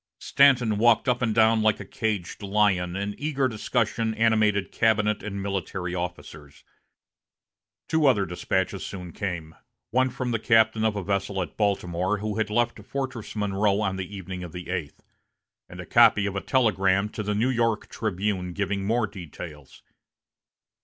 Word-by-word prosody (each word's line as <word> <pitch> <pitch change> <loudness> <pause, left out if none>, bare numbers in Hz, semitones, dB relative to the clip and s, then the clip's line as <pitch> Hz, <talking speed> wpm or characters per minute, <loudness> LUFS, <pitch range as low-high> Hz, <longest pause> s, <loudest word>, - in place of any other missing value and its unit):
Stanton 125 -7 +3
walked 120 +2 +4
up 125 0 +1
and 110 -3 0
down 110 0 +4
like 110 -1 +2
a 100 - -7
caged 105 -3 -3
lion, 100 -3 +1
and 100 +1 -3
eager 145 -3 0
discussion 110 -1 -1
animated 110 -3 +2
cabinet 105 -1 +2
and 100 -2 -5
military 95 -2 -3
officers. 75 -5 -7 1.2
Two 160 -2 +2
other 105 -7 +3
despatches 95 +2 -2
soon 90 -3 -7
came, 85 -4 -5 0.4
one 130 +2 +3
from 125 -1 -3
the 115 - 0
captain 110 -1 +3
of 110 -1 +1
a 100 - -3
vessel 100 0 -1
at 90 -4 -4
Baltimore, 95 -1 0
who 105 +1 -3
had 110 -1 0
left 120 +2 0
Fortress 130 -6 -5
Monroe 100 -1 +1
on 95 -2 -1
the 95 +2 -6
evening 95 -1 -6
of 85 -2 -8
the 90 0 -6
eighth, 85 -6 -5 0.7
and - - -11
a - - -6
copy 100 - +5
of 100 -1 -3
a 100 - -2
telegram 100 -6 +2
to 105 - -5
the 105 0 -2
"New 120 +5 +1
York 115 -3 0
Tribune," 95 -3 -2
giving 100 +1 -2
more 115 +3 +1
details. 75 -7 -10
105 Hz, 160 wpm, -25 LUFS, 95-110 Hz, 1.2 s, copy